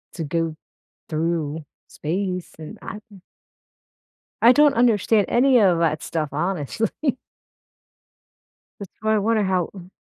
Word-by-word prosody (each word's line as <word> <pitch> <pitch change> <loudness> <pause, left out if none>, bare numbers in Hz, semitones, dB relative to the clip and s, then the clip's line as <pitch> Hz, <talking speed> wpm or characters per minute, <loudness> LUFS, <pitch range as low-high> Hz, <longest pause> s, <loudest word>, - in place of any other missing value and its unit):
to 165 - -4
go 165 +1 -2 0.6
through 160 -1 -2 0.2
space 180 +3 -3
and 155 -1 -9
I 210 - -7 1.4
I 235 - +8
don't 290 +2 +5
understand 225 -3 +3
any 255 +1 +4
of 185 -5 +4
that 155 -2 +1
stuff, 155 -3 -2
honestly. 190 - -2 1.6
That's 200 -3 -9
why 220 0 +2
I - - +3
wonder 215 +1 +1
how 185 -3 0
ooh, 180 -2 -11
185 Hz, 120 wpm, -22 LUFS, 160-220 Hz, 1.6 s, I